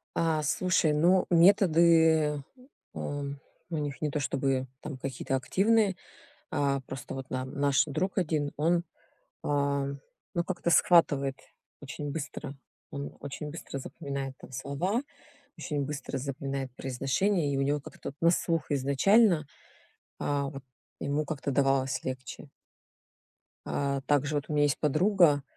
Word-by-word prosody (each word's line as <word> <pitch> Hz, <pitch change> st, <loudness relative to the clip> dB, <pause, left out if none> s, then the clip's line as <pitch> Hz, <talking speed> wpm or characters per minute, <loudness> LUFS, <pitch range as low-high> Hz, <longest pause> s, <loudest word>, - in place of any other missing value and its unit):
А, 160 Hz, -2 st, +1 dB
слушай, 170 Hz, +1 st, +2 dB
ну, 175 Hz, +5 st, +4 dB
методы, 165 Hz, -4 st, +5 dB, 0.5 s
эм, 140 Hz, -1 st, -4 dB, 0.3 s
у 165 Hz, -, -2 dB
них 145 Hz, -2 st, -4 dB
не 155 Hz, -, 0 dB
то 150 Hz, -, -2 dB
чтобы 135 Hz, -1 st, 0 dB
там 140 Hz, -3 st, -6 dB
какие-то 135 Hz, 0 st, -3 dB
активные. 200 Hz, -, +2 dB, 0.6 s
А, 140 Hz, -2 st, +1 dB
просто 130 Hz, -1 st, -8 dB
вот 135 Hz, -1 st, -6 dB
нам 130 Hz, 0 st, -3 dB
наш 140 Hz, -1 st, +3 dB
друг 160 Hz, +7 st, -2 dB
один, 155 Hz, -5 st, 0 dB
он, 170 Hz, +3 st, +2 dB, 0.6 s
а, 140 Hz, -1 st, +1 dB, 0.5 s
ну, 170 Hz, -, +1 dB
как-то 175 Hz, -1 st, -2 dB
схватывает 145 Hz, -6 st, +4 dB, 0.4 s
очень 145 Hz, +1 st, -5 dB
быстро, 145 Hz, -1 st, -5 dB, 0.4 s
он 140 Hz, 0 st, -6 dB
очень 145 Hz, +1 st, -6 dB
быстро 145 Hz, -3 st, -6 dB
запоминает 140 Hz, -1 st, -5 dB
там -, -, -13 dB
слова, 140 Hz, -, -1 dB, 0.6 s
очень 145 Hz, -3 st, -2 dB
быстро 140 Hz, -2 st, -4 dB
запоминает 135 Hz, 0 st, -4 dB
произношение, 140 Hz, +6 st, 0 dB
и 135 Hz, -, 0 dB
у 135 Hz, -, +2 dB
него 145 Hz, +1 st, +1 dB
как-то -, -, -8 dB
от 140 Hz, -, -18 dB
на 170 Hz, 0 st, +5 dB
слух 165 Hz, -1 st, 0 dB
изначально. 155 Hz, -, +4 dB, 0.8 s
А 140 Hz, -1 st, 0 dB
вот 135 Hz, -1 st, -9 dB, 0.4 s
ему 145 Hz, +2 st, 0 dB
как-то 140 Hz, -1 st, -3 dB
давалось 135 Hz, -1 st, +2 dB
легче. 130 Hz, -1 st, -6 dB, 1.2 s
А, 140 Hz, -1 st, -1 dB
также, 145 Hz, +1 st, +1 dB
вот, 145 Hz, -, -1 dB
у -, -, -2 dB
меня 145 Hz, 0 st, +3 dB
есть 145 Hz, -2 st, +1 dB
подруга, 155 Hz, -1 st, +4 dB
145 Hz, 135 wpm, -29 LUFS, 135-165 Hz, 1.2 s, методы